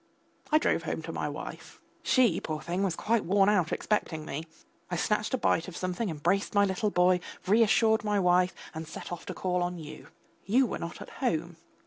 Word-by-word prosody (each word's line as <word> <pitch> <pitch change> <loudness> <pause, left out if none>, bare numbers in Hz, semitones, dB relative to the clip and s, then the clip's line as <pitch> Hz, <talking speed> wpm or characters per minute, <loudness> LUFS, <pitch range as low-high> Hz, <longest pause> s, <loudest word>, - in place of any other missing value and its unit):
I 305 - +6
drove - - +1
home - - -4
to - - -5
my - - -2
wife. - - -8 0.2
She, 235 -10 +3
poor 155 -1 -3
thing, 175 +4 -3
was 190 -4 0
quite 225 +3 +1
worn 195 +2 +4
out 180 -5 +2
expecting 160 -7 -1
me. 155 +3 -5 0.4
I 175 - -2
snatched 210 +7 0
a - - -1
bite 165 -7 +1
of 185 - -7
something, 185 +4 -2
embraced 175 +7 0
my 200 0 +5
little 195 +2 0
boy, 180 -1 +3 0.3
reassured 220 +1 +4
my 210 -1 +1
wife 180 0 +3 0.2
and 160 0 -6
set 165 - -8
off 175 - -6
to - - -5
call 180 -1 -1
on 175 0 -2
you. 155 -2 -9 0.4
You 250 +7 +3
were - - -4
not 170 - -6
at - - -13
home. 170 -8 -1
185 Hz, 200 wpm, -29 LUFS, 170-210 Hz, 0.4 s, I